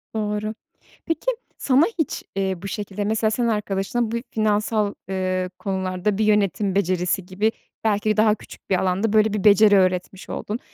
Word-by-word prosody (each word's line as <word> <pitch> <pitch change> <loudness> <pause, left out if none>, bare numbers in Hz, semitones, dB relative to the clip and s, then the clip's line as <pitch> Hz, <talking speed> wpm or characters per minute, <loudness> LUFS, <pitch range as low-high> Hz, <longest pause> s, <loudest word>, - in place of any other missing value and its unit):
Doğru. 210 0 -2 0.5
Peki, 330 +9 0 0.3
sana 270 +2 +4 0.2
hiç, 315 - -1
eee, 190 -1 0
bu 200 - -5
şekilde, 205 0 -4
mesela, 220 +1 +1
sen 235 +2 0
arkadaşına 210 +2 -1
bu - - -2 0.2
finansal, 215 -1 +1 0.2
eee, 185 -1 -1
konularda 190 0 -1
bir 215 - +2
yönetim 205 -1 +2
becerisi 180 -1 0
gibi, 200 +4 0 0.3
belki 215 -1 +1
de 215 - +1
daha 215 0 +4
küçük - - -15
bir 195 - +3
alanda 190 +4 0
böyle 215 -1 +4
bir 210 - -2
beceri 210 0 +7
öğretmiş 185 0 0
oldun. 215 +4 -4
210 Hz, 160 wpm, -23 LUFS, 190-215 Hz, 0.5 s, beceri